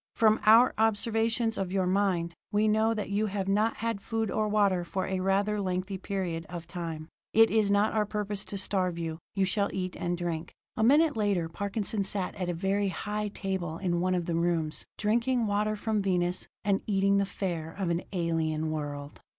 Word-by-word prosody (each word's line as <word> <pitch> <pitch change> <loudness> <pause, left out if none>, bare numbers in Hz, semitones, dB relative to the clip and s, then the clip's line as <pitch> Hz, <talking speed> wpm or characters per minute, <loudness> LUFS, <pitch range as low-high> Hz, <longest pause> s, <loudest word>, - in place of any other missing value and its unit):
"From 220 -1 +4
our 230 +4 +7
observations 225 +1 +1
of 190 -2 -2
your 190 -1 +1
mind, 180 -3 +1 0.2
we 210 +1 +3
know 220 +1 +3
that 210 -2 -4
you 210 +2 +1
have 195 -1 -3
not 210 +3 +2
had 230 -3 -2
food 225 -2 -2
or 215 0 +1
water 200 -4 +2
for 185 +2 -3
a 190 0 -2
rather 200 +2 +1
lengthy 185 +1 -2
period 185 -4 -3
of 175 -1 -6
time. 165 -4 -5 0.3
It 225 0 +6
is 220 -2 +3
not 205 +1 +3
our 215 -1 +1
purpose 205 -1 -2
to 200 - -5
starve 185 -3 0
you: 165 -1 -4 0.2
you 195 -1 +2
shall 200 +2 0
eat 185 -1 -3
and 175 -1 -2
drink." 170 -1 -3 0.2
A - - -2
minute 295 +5 +5
later 200 -6 +1
Parkinson 200 +3 -2
sat 195 -1 -2
at 185 -3 -3
a - - 0
very 195 +3 0
high 210 +2 -3
table 190 -5 -3
in 175 -2 0
one 185 0 +1
of 175 -2 -1
the 170 - -2
rooms, 165 -2 0
drinking 235 +3 +1
water 210 +1 0
from 215 0 -1
Venus, 180 -2 0 0.2
and 200 -1 +1
eating 200 -1 +3
the 200 - +2
fare 170 -5 -3
of 190 -4 -1
an 170 +1 0
alien 160 -3 -1
world. 145 -2 -5
195 Hz, 195 wpm, -29 LUFS, 175-210 Hz, 0.3 s, our